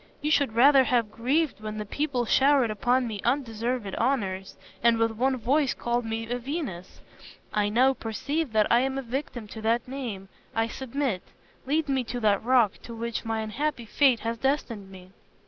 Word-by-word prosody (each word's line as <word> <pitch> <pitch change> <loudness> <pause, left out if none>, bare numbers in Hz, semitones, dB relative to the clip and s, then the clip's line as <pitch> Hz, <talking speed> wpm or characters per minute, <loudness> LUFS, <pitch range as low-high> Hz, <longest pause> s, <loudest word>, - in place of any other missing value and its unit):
You 300 - -1
should 280 -7 +2
rather 265 +3 +6
have 235 -4 +1
grieved 270 +6 0
when 215 0 -5
the 210 - -4
people 260 +1 -1
showered 270 -1 +4
upon 245 +4 +1
me 210 -3 -5
undeserved 235 -4 -1
honors, 200 -7 -1 0.2
and 235 0 +4
with 225 0 +2
one 260 +4 0
voice 270 +4 +1
called 240 0 -1
me 225 0 -3
a 245 +1 -2
Venus. 250 - -5 0.5
I 205 -1 +1
now 255 +5 +4
perceive 280 +6 -3
that 215 -1 +4
I 235 - +6
am 265 +1 -1
a 270 - -3
victim 245 -2 -4
to 220 - -8
that 230 +3 +1
name. 240 -8 -5 0.3
I 225 0 +1
submit. 265 -6 -2 0.5
Lead 305 +2 +1
me 270 -2 +1
to 245 +2 -4
that 210 -3 +2
rock 240 -4 +3
to 235 - -9
which 230 0 -4
my 225 0 -1
unhappy 240 +3 -2
fate 255 +1 +3
has 230 0 -3
destined 240 -7 -1
me." 185 -1 -13
235 Hz, 180 wpm, -27 LUFS, 220-270 Hz, 0.5 s, rather